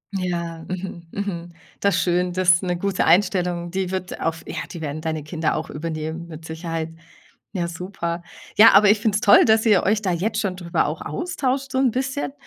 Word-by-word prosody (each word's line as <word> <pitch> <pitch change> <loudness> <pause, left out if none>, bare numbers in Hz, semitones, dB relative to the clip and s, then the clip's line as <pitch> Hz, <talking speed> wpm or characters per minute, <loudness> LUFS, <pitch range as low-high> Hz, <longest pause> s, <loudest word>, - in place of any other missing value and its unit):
Ja, 170 -3 -3
mhm, 180 -2 -6
mhm, 175 -4 -5 0.3
das 200 -3 +2
schön, 180 0 +1
das 175 -2 +4
'ne 180 -2 -1
gute 195 0 0
Einstellung, 175 -1 +2
die 190 0 -2
wird 185 -1 -4
auf 165 0 -2
ja, - - -6
die 170 - -7
werden 155 0 -4
deine 160 -2 -3
Kinder 160 +1 -1
auch 160 - -4
übernehmen 160 +1 -5
mit 160 0 -10
Sicherheit. 160 0 -4 0.7
Ja, 175 -2 -1
super. 170 0 -4 0.3
Ja, 225 +2 +8
aber 200 +1 +7
ich 215 - +2
finde 210 -1 +1
es 210 - +1
toll, 205 - +7
dass 220 0 +4
ihr 210 -5 +4
euch 210 +2 +2
da 185 - +1
jetzt 210 +6 -1
schon 195 -3 -1
drüber 175 -2 0
auch - - -3
austauscht 275 -6 -2
so 260 - 0
'n 265 -2 +4
bisschen, 265 +4 -2
180 Hz, 195 wpm, -22 LUFS, 170-200 Hz, 0.7 s, Ja